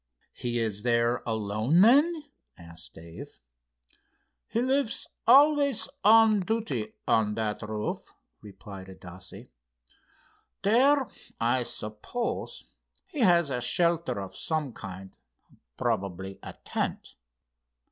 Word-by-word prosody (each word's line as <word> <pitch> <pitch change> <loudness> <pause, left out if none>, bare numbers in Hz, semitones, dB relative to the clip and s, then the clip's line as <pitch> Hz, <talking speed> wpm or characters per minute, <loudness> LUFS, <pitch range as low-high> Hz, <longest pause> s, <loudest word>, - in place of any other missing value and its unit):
"He 120 -1 -3
is 110 -3 -1
there 120 0 +1
alone, 110 - +1
then?" 295 - +5 0.3
asked 85 -1 -11
Dave. 80 0 -11 1.1
"He 230 - -1
lives 260 -1 0 0.2
always 285 0 +5
on 220 0 +6
duty 180 - -2
on 105 -2 +2
that 110 -1 -2
roof," 105 -1 -4 0.3
replied 100 -2 -11
Adasse. 95 0 -11 1.1
"There, 260 +6 +4 0.3
I 120 +3 +2
suppose, 110 - -5 0.4
he 375 -6 -8
has 170 - +4
a 125 -1 -2
shelter 170 - +1
of 95 -1 -7
some 155 -6 -2
kind, 95 -2 -9 0.6
probably 95 0 -2
a - - -8
tent. - - -3
120 Hz, 100 wpm, -28 LUFS, -, 1.1 s, on